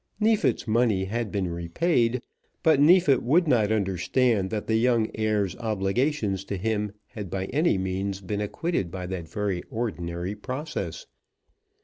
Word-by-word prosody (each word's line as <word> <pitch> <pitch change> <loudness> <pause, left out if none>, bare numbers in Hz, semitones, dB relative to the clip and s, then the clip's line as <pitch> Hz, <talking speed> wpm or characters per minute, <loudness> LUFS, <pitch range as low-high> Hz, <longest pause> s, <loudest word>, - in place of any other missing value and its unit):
Neefit's 215 - +2
money 110 -4 +2
had 115 +2 -3
been 100 -3 -1
repaid, 115 - 0 0.4
but 160 -3 +5
Neefit 150 -2 +5
would 165 +8 +3
not 110 -6 +3
understand 100 +1 +1
that 105 0 -3
the 110 - +2
young 115 -2 +2
heir's 105 -3 0
obligations 110 0 0
to 100 - -3
him 105 +1 -1 0.2
had 105 -4 -7
by 95 +2 -2
any 150 - +3
means 95 +1 -2
been 100 +2 -3
acquitted 105 - -2
by 90 +1 -5
that 90 -3 -5
very 100 -4 -2
ordinary 90 -5 -3
process. 140 - -5
105 Hz, 140 wpm, -26 LUFS, 95-125 Hz, 0.4 s, but